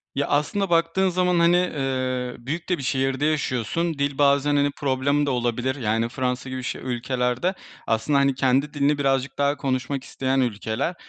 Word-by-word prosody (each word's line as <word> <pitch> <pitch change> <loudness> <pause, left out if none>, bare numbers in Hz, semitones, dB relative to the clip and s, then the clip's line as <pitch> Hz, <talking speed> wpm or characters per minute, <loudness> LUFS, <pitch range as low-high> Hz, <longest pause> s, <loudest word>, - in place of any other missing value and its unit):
Ya, 140 - 0
aslında 175 +7 0
baktığın 170 +3 +2
zaman, 180 -1 +1
hani, 170 +1 +5
eee, 130 -7 -1
büyük 155 +9 -5
de 180 - +2
bir 140 - -7
şehirde 135 +1 0
yaşıyorsun. 155 +2 0
Dil 140 -1 -1
bazen, 140 0 +3
hani, 145 0 +2
problem 140 +1 +1
de - - -1
olabilir, 125 +1 -1
yani, 115 -2 0
Fransa 125 0 -2
gibi 130 0 -5
ş - - -4
ülkelerde 125 +6 -1 0.3
aslında, 115 +6 +2
hani, 140 -1 +2
kendi 135 +3 +1
dilini 145 0 +2
birazcık 135 -1 0
daha 145 +1 +1
konuşmak 135 0 -2
isteyen 135 0 -1
ülkeler 120 - -1
135 Hz, 170 wpm, -24 LUFS, 130-145 Hz, 0.3 s, hani